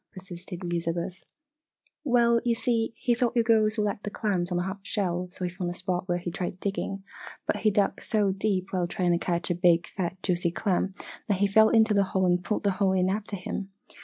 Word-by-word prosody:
persisted 180 -1 -9
Elizabeth. 175 +1 -3 0.8
"Well, 235 -4 +3
you 240 -2 +2
see, 230 -1 0
he 245 - +1
thought 240 0 0
you 235 - +4
girls 220 -1 +3
would 210 - +2
like 205 0 -2
clams 205 -4 -1
on 175 - +1
the 175 - 0
half 190 +2 -4
shell 180 -3 -2
so 180 - -8
he 180 - 0
found 180 -1 -3
a 175 - -4
spot 180 0 -2
where 175 -1 +1
he 175 0 -4
tried 180 0 -4
digging. 195 0 -3 0.4
But - - 0
he 215 - +3
dug 205 -1 +1
so 210 -3 +1
deep 195 -1 -1
while 180 -2 0
trying 175 0 0
to 170 - +2
catch 175 0 -1
a - - +3
big 175 -1 +3
fat 180 -1 -3
juicy 175 -1 +1
clam, 190 +2 0 0.3
that 200 -4 +1
he 200 - +3
fell 220 +2 +5
into 220 -1 +4
the 200 -1 +4
hole 190 - +3
and 180 0 +2
pulled 210 - -1
the 200 - +3
hole 190 0 +1
in 185 0 +2
after 205 0 -3
him. 190 +1 -5
190 Hz, 220 wpm, -27 LUFS, 180-210 Hz, 0.8 s, fell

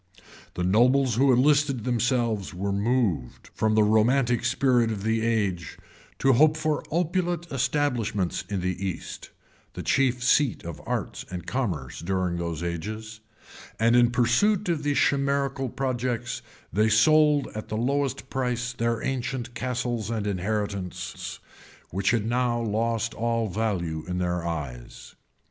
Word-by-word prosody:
The 90 - -2
nobles 125 +7 +4
who 135 +1 +5
enlisted 135 -1 +3
themselves 120 -5 0
were 100 +2 -2
moved, 100 - -1
from 110 0 +1
the 110 - +5
romantic 120 +3 +3
spirit 120 -1 +2
of 100 -2 -4
the 110 +1 +1
age, 100 -8 -1 0.4
to 135 0 +4
hope 155 +5 +5
for 155 -1 0
opulent 175 +1 0
establishments 125 - 0
in 100 -3 -2
the 90 +1 -2
East, 95 -4 -5 0.4
the - - -6
chief 125 -2 +1
seat 135 0 +2
of 85 -2 -7
arts - - -3
and 90 -1 -6
commerce 90 - -3
during 90 0 -1
those 85 -1 -3
ages; 110 +6 -5 0.6
and 115 +2 +4
in 120 -1 +5
pursuit 155 - +2
of 165 -3 0
these 145 -1 0
chimerical 140 -1 +1
projects, 120 -2 -2 0.3
they 110 +4 +3
sold 150 +6 +4
at 110 - -6
the 110 - -3
lowest 140 +2 -1
price 125 -2 -1
their 115 -1 -1
ancient 125 -2 -3
castles 120 -2 -2
and 110 -3 -2
inheritances, 95 -2 -3 0.5
which 95 +3 0
had 110 -2 +1
now 120 0 +1
lost 115 +1 -1
all 115 -1 0
value 90 -6 -2
in 90 0 -3
their 90 -1 -1
eyes. 70 -8 -6
115 Hz, 140 wpm, -26 LUFS, 100-130 Hz, 0.6 s, who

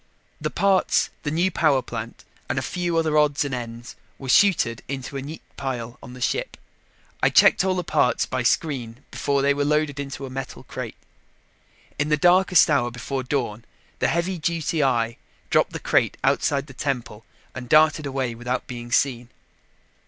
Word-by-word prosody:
The - - -1
parts, 195 -2 +2
the 145 - -3
new 170 +5 +1
power 145 -6 +2
plant 115 -1 -7 0.3
and - - -1
a - - 0
few 175 -2 -2
other 155 -2 +3
odds 145 -1 +2
and 140 - -4
ends 120 -1 -6 0.2
were 135 - -8
chuted 140 - +4
into 135 0 -5
a 135 - -3
neat 150 +4 -8
pile 120 -3 -4
on 125 - -11
the 125 - -10
ship. - - -1 0.6
I - - +4
checked - - +5
all 190 -1 +1
the 180 - -1
parts 125 - +2
by 130 0 -2
screen 125 -2 -1
before 140 -1 0
they 140 0 +4
were 145 0 -1
loaded 150 -1 0
in 140 -1 -4
a 135 -1 -6
metal 135 0 -6
crate. - - -7 1.0
In 145 +1 0
the 150 - +3
darkest 180 +3 +5
hour 140 -6 +2
before 130 +3 -4
dawn, 120 -4 -2 0.4
the - - +2
heavy 170 +2 -1
duty 165 0 -1
eye 120 -3 +1 0.3
dropped - - +3
the - - -5
crate - - +1
outside 140 -1 +1
the 135 - -13
temple 125 -5 -3 0.3
and 125 -2 -8
darted 155 0 +4
away 130 -3 -2
without 125 +2 -3
being 120 -2 -8
seen. 120 -2 +1
140 Hz, 175 wpm, -24 LUFS, 125-155 Hz, 1.0 s, checked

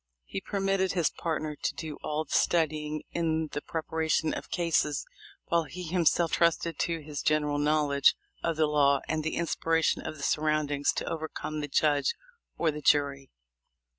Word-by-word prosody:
He 195 - -5
permitted 195 -1 0
his 175 -4 +2
partner 155 -2 -3
to - - -2
do 155 -2 -6
all 155 +1 -1
the 150 - -8
studying 155 -2 +1
in 160 -2 0
the 145 - -3
preparation 160 -1 -1
of - - -6
cases, 165 -4 +1 0.4
while 170 -1 +1
he 180 +5 -7
himself 170 -1 +2
trusted 170 -2 +1
to 165 -2 -1
his 145 -1 -5
general 150 -1 +1
knowl 150 0 +2
edge 140 0 +5 0.3
of 165 - 0
the 155 0 +3
law 140 -2 +3
and 155 0 -1
the 160 - -2
inspiration 165 -1 +1
of 155 - -6
the 140 - -8
surround 155 -1 +1
ings 145 0 +2
to - - -3
overcome 160 -1 -4
the 145 - -3
judge 145 0 +2 0.4
or 165 - +2
the 150 0 -7
jury. 140 -2 +2
155 Hz, 170 wpm, -29 LUFS, 150-165 Hz, 0.4 s, edge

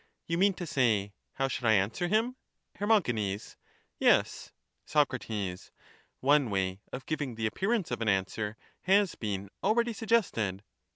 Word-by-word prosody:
You 170 +1 -1
mean 195 0 +4
to 180 - -5
say, 110 -9 +1 0.2
how 135 - 0
should 130 - -4
I 110 - +5
answer 105 - +1
him? 225 +6 +1 0.4
Her. 205 - -2 1.1
Yes. - - +2 0.3
Soc. 145 -4 +2 1.1
One 140 -2 +4
way 95 -1 -1
of 130 - -6
giving 145 -6 -3
the 110 0 -2
appearance 195 - 0
of 120 - -2
an 110 - +1
answer 105 +3 -1 0.3
has 195 -1 +4
been 100 -2 -4
already 235 +3 +2
suggested. 165 - 0
135 Hz, 135 wpm, -30 LUFS, -, 1.1 s, I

